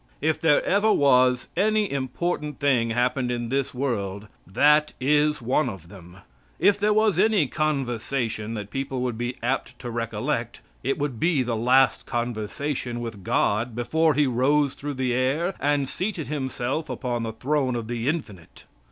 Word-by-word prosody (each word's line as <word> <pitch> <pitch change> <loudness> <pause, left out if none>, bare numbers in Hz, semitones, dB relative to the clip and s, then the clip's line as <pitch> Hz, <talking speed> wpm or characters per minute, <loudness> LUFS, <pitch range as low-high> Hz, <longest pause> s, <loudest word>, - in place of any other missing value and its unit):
If 155 +1 0
there 160 -3 +3
ever 205 +3 +3
was 125 -5 +4
any 215 +2 +2
important 150 +2 -3
thing 130 -5 +2
happened 125 +2 0
in 120 -1 -2
this 135 +1 -1
world, 105 -7 -3 0.2
that 150 +10 +3
is 150 +1 +2
one 130 +3 +1
of 90 -6 -10
them. 90 -2 -13 0.4
If 205 0 +3
there 210 +1 +2
was 215 -4 +3
any 210 -5 +4
conversation 125 -6 -2
that 105 -2 -6
people 135 0 -3
would 125 -2 -1
be 120 +2 -3
apt 130 +3 -2
to 120 -2 -6
recollect, 115 0 -3 0.2
it 135 - -1
would 140 -6 -3
be 165 -6 +2
the 120 -2 -2
last 125 +4 +3
conversation 120 +2 -3
with 115 -5 -6
God 110 +5 0
before 155 +6 +1
He 150 +1 +3
rose 135 +3 +2
through 145 0 -5
the 130 -1 0
air 140 +9 0
and 145 -1 +1
seated 180 - -3
Himself 135 0 -3
upon 120 -3 -3
the 115 -1 -4
throne 130 +2 0
of 115 -2 -4
the 120 +2 -2
Infinite. 105 - -6
130 Hz, 160 wpm, -25 LUFS, 120-150 Hz, 0.4 s, was